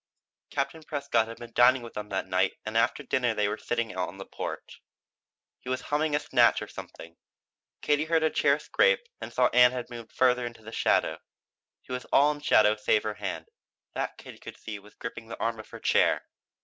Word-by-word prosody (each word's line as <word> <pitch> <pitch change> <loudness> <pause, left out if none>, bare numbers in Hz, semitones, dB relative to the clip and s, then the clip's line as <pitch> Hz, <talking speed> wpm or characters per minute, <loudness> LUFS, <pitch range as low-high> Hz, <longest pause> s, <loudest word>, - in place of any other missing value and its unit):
Captain 145 +3 -2
Prescott 140 -7 0
had 115 - -8
been 120 -1 -11
dining 125 +1 +5
with 115 - -9
them 105 0 -6
that 95 -1 -2
night 95 0 +1
and 110 0 -5
after 115 +5 +2
dinner 125 -4 0
they 105 -1 +1
were 105 - -1
sitting 115 0 -2
out 90 -1 -2
on 95 - -10
the 95 - -8
porch. - - -7 0.8
He 125 - -9
was 130 0 0
humming 150 0 0
a - - +2
snatch 145 - +3
of - - -10
something. 85 0 -10 0.7
Katie 150 +1 +2
heard 160 0 +2
a 155 - +2
chair 140 0 +3
scrape - - +2 0.2
and - - -6
saw - - +3
that - - -8
Ann 125 0 +7
had 125 -1 -5
moved 115 -2 -9
farther 125 -1 +3
into 115 -2 -11
the 110 - -9
shadow. - - +1 0.6
She - - -13
was 125 0 -4
all 145 +2 +4
in 150 - -6
shadow 105 -6 +5
save 105 0 +1
her 110 - -2
hand; - - -5 0.5
that - - -3
Katie - - -12
could - - -10
see 105 -2 -7
was 105 +1 -18
gripping 115 -1 -7
the 115 - -8
arm 115 0 -1
of 110 - -10
her - - -9
chair. - - +3
120 Hz, 215 wpm, -28 LUFS, 110-140 Hz, 0.8 s, Ann